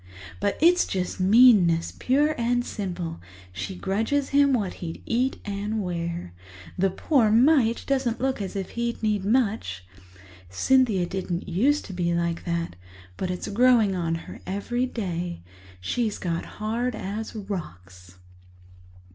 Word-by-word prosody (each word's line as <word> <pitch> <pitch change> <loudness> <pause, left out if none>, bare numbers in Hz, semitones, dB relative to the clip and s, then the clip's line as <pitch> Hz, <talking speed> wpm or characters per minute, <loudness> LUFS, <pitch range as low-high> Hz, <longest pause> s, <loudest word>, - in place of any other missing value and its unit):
But 200 0 0
it's 350 +3 +5
just 185 -1 -3
meanness, 190 -5 +5
pure 290 +4 +2
and 245 0 0
simple; 175 -5 -5 0.3
she 185 - -5
grudges 225 +10 -1
him 280 0 +4
what 210 -8 0
he'd 165 -2 -6
eat 250 +3 0
and 205 +2 -3
wear. 170 - -4 0.4
The 195 +1 +2
poor 230 - +2
mite 235 0 +4
doesn't 260 -4 0
look 260 -3 -1
as 195 -1 -5
if 195 -2 -4
he'd 235 -1 -3
need 210 -3 +1
much. 200 - 0 0.6
Cynthia 215 - +3
didn't 180 -1 -4
used 255 - +2
to 195 - -8
be 170 -1 0
like 170 0 -2
that, 170 - -2 0.4
but 185 - -3
it's 180 -1 -4
growing 225 -2 +4
on 165 -2 -1
her - - -10
every 240 +6 -1
day. 175 - -4 0.4
She's 215 - -1
got 170 -2 -3
hard 230 +4 -1
as 215 +4 -5
rocks." 90 - -7
200 Hz, 140 wpm, -25 LUFS, 175-240 Hz, 0.6 s, it's